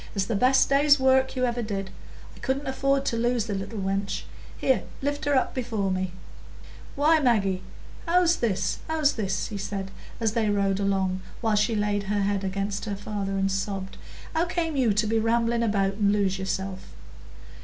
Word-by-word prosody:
"It's 195 -1 +1
the 225 - -1
best 255 +5 +4
day's 285 +1 +5
work 265 0 +3
you 255 0 +1
ever 240 0 -1
did. 195 -3 -4 0.4
I - - -15
couldn't 275 +2 -2
afford 275 +1 +1
to 250 - 0
lose 240 -1 +1
the 215 - -3
little 195 +3 -4
wench; 195 0 -2 0.3
here, 265 - +2 0.2
lift 285 +2 -2
her 290 -1 +2
up 260 - +1
before 225 -6 -1
me." 185 -1 -1 0.8
"Why, 310 +3 +4
Maggie, 200 -9 +2 0.5
how's 345 0 +4
this, 195 -5 0
how's 315 -2 +2
this?" 195 -4 -2
he 205 -3 -5
said, 195 -1 -4 0.3
as 225 -2 +1
they 220 -1 +1
rode 200 -1 +1
along, 190 -2 0 0.2
while 220 -3 +1
she 215 +2 +2
laid 205 -1 0
her 205 -1 +1
head 200 0 0
against 195 +2 -2
her 205 -2 -3
father 200 -1 -4
and 195 0 +1
sobbed. 195 0 -3 0.4
"How 325 +2 +2
came 335 -3 -2
you 255 -5 +3
to 210 +2 +1
be 225 +1 +1
rambling 230 +1 +1
about 200 -3 +1
and 200 0 +2
lose 195 -2 +1
yourself?" 190 0 -3
210 Hz, 185 wpm, -26 LUFS, 195-260 Hz, 0.8 s, day's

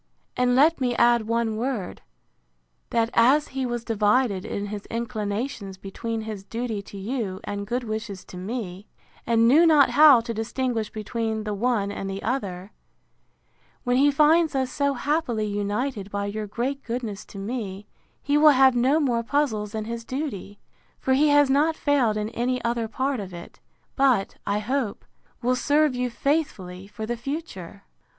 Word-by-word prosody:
And 250 0 +2
let 300 +3 +4
me 245 -2 +1
add 235 -2 +3
one 230 -1 0
word; 235 -5 -3 0.9
That 230 0 +1
as 270 +6 +4
he 265 -1 -2
was 240 -1 -3
divided 210 -2 +1
in 200 - -3
his 205 0 -6
inclinations 215 -2 -4
between 225 +4 -5
his 215 -3 -6
duty 225 0 -4
to 200 0 -11
you 200 -2 -3
and 200 0 -5
good 245 +3 -2
wishes 215 -4 -5
to - - -12
me, 195 0 -5 0.4
and 230 0 +4
knew 295 +8 +6
not 310 -4 +5
how 295 -4 +8
to 230 0 -5
distinguish 225 0 -2
between 220 0 -3
the 210 -1 -3
one 205 -1 0
and 195 -1 -5
the 195 0 -5
other, 200 -6 -3 1.1
when 245 0 +1
he 285 +2 +5
finds 305 +2 +4
us 260 -1 0
so 280 0 0
happily 280 -6 -1
united 205 +2 -2
by 200 0 -3
your 210 +1 -4
great 260 +6 -3
goodness 230 -4 -4
to - - -12
me, 200 -2 -5 0.4
he 290 +1 +2
will 305 0 +8
have 265 -1 +6
no 260 +6 +3
more 245 -6 +1
puzzles 225 -5 -1
in 215 -1 -3
his 230 +1 -5
duty; 230 -7 -5 0.4
for 265 - 0
he 290 +3 +4
has 290 -1 +5
not 295 +4 +2
failed 265 -9 +1
in 210 0 -2
any 250 +2 -1
other 235 -1 0
part 260 +3 -1
of 190 -3 -7
it; 170 - -11 0.4
but, 260 -8 +2
I 200 - +1
hope, 230 +1 -2 0.4
will 250 +1 +2
serve 295 +2 +2
you 250 0 -1
faithfully 220 - -2
for 210 +2 -6
the 240 +2 -2
future. 235 - -6
230 Hz, 170 wpm, -25 LUFS, 205-265 Hz, 1.1 s, how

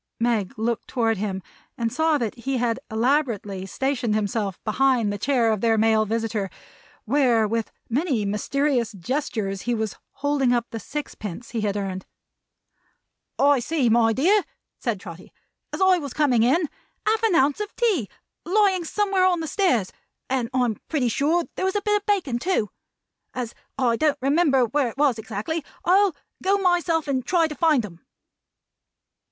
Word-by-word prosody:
Meg 230 -1 0
looked 230 +1 -2
toward 225 -4 0
him 190 -2 -3 0.3
and 230 -1 -1
saw 320 -1 +2
that 230 -6 -2
he 260 +2 -3
had 235 -2 0
elaborately 220 -6 0
stationed 245 +3 -1
himself 205 -2 -1
behind 235 -2 +2
the - - -3
chair 240 -1 +2
of 215 -3 -1
their 225 -1 +3
male 220 0 +3
visitor, 225 -2 -1 0.6
where 245 -3 +3
with 225 0 -2 0.2
many 255 - 0
mysterious 240 +3 0
gestures 200 - -3
he 240 0 -1
was 220 -2 -3 0.2
holding 280 -3 +1
up 240 -1 +1
the 225 - -4
six 295 +6 -5
pence 210 +3 -7
he 230 -2 -2
had 205 -1 -1
earned. 190 -2 -4 1.3
"I 285 -1 +4
see, 275 -1 +1
my 225 0 +4
dear," 360 - +3 0.4
said 230 -5 -2
Trotty, 180 -2 -11 0.4
"as - - -5
I 375 -1 +5
was 285 -5 -7
coming 270 -7 +3
in, 290 +8 +3 0.4
half 440 0 +2
an 445 -6 +2
ounce 280 +4 +3
of 420 0 -5
tea 390 - +1 0.3
lying 380 0 +2
somewhere 390 +1 +1
on 355 -2 +2
the 325 - -3
stairs; 255 - +1 0.4
and 250 -3 0
I'm 245 -4 +1
pretty 270 -6 +1
sure 310 +9 +1
there - - -1
was 380 - 0
a 410 - +1
bit 420 0 +3
of 410 - -9
bacon 345 -13 +1
too. 260 - 0 0.6
As 245 -2 -4 0.2
I 240 -3 +2
don't 300 0 +2
remember 275 -1 +3
where 275 +3 0
it 245 - -12
was 275 -6 +2
exactly, 220 +9 -4 0.2
I'll 380 -1 +4 0.3
go 390 +2 +2
myself 350 -4 +1
and 260 -2 0
try 335 +3 +2
to 305 - -6
find 300 -5 +2
'em." 170 -4 -13
250 Hz, 170 wpm, -24 LUFS, 220-315 Hz, 1.3 s, I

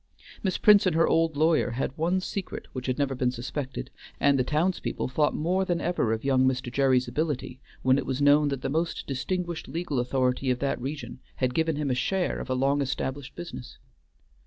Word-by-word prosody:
Miss 190 -3 0
Prince 205 -2 +6
and 175 - +1
her 165 - +4
old 165 -2 +2
lawyer 155 -3 +3
had 135 0 -2
one 175 +4 +1
secret 190 0 -5
which 130 -1 -5
had 130 - 0
never 140 -2 0
been 125 -1 +1
suspected, 130 +2 -5 0.3
and 140 -1 +4
the - - +3
townspeople 160 +8 -1
thought 150 +3 +1
more 180 +5 +1
than 175 -2 0
ever 170 -10 0
of 110 0 -2
young 130 -1 +4
Mr. 125 -1 -1
Gerry's 130 -2 +3
ability 130 -1 -2 0.2
when 130 +1 +4
it - - -4
was 130 0 -1
known 145 +1 +5
that 140 -2 -3
the - - 0
most 165 +4 -1
distinguished 170 +5 -3
legal 165 -5 -2
authority 125 +1 0
of 125 - +2
that 135 -1 -2
region 145 +3 -5 0.2
had 125 -1 0
given 160 +1 +1
him 145 -2 -1
a - - +2
share 180 +9 0
of - - -6
a 130 - +1
long 140 +2 +2
established 135 0 -3
business. 170 -8 -8
140 Hz, 205 wpm, -27 LUFS, 130-165 Hz, 0.3 s, Prince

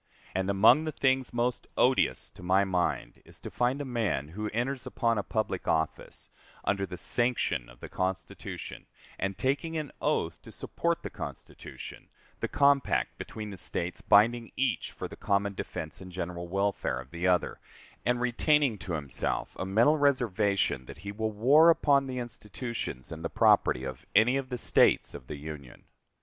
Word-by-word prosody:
And 95 +1 -1
among 110 +10 +6
the 155 - -2
things 130 -2 +1
most 120 +1 -1
odious 130 +1 +2
to - - -14
my 95 +2 +3
mind 90 -2 -1
is - - -16
to - - -7
find 125 +3 +1
a 145 - -3
man 110 - -1
who 105 +5 -4
enters 125 +4 -2
upon 115 -2 +1
a - - +1
public 85 - -2
office, 80 -1 -2 0.3
under 100 0 0
the 90 - -7
sanction 120 - 0
of - - -17
the - - -6
Constitution, 95 0 -4 0.3
and 95 -1 -2
taking 150 +5 -1
an 150 -3 -4
oath - - 0
to - - -12
support - - -2
the - - -5
Constitution - - -9 0.3
the - - -1
compact 140 -1 +2
between 105 -1 -6
the 95 - -8
States 85 +1 -3
binding 115 +3 +4
each 135 -2 0
for - - -6
the - - -10
common 100 0 0
defense 80 -4 -6
and 90 -1 -9
general 85 -1 -5
welfare 95 -8 -1
of 65 +1 -11
the 85 +2 -1
other 90 -2 +1 0.4
and 125 0 +1
retaining 125 0 +2
to 90 - -5
himself 75 -4 -2
a 95 - -2
mental 120 +10 +4
reservation 105 - +1
that - - -9
he 100 - -3
will 110 +2 -2
war 135 +10 +6
upon 140 -4 +4
the 130 -1 -4
institutions 115 - -5
and 80 0 -7
the 85 - -2
property 65 - +3
of 65 -1 -6
any 115 +5 +5
of 135 -1 -2
the 125 - -3
States - - +3
of 65 - -10
the 75 - -6
Union. 70 -3 -9
105 Hz, 175 wpm, -29 LUFS, 90-125 Hz, 0.4 s, among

